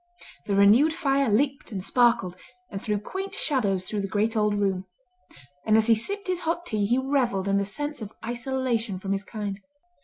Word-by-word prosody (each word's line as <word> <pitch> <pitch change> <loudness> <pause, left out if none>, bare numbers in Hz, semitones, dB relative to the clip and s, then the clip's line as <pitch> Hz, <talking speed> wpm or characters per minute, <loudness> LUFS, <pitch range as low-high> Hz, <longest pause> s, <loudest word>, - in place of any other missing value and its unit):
The 200 - +1
renewed 225 +11 +5
fire 275 -5 +1
leaped 270 +5 0
and 190 -3 -4
sparkled, 230 -6 +2 0.4
and 195 -2 -5
threw 210 -1 -1
quaint 385 - -5
shadows 200 - 0
through 205 +2 -2
the 195 - -3
great 215 +3 0
old 210 -1 +2
room; 195 -2 0 0.8
and 215 0 +4
as 220 - +3
he 230 - +5
sipped 400 - -2
his 365 -2 -1
hot 340 +1 -2
tea 210 -8 0
he 240 +4 +2
revelled 260 -8 0
in 200 0 +2
the 200 - 0
sense 290 +6 -5
of 210 -1 -6
isolation 240 -3 -2
from 195 +1 -5
his 195 0 -1
kind. 205 -2 -5
220 Hz, 190 wpm, -26 LUFS, 200-270 Hz, 0.8 s, renewed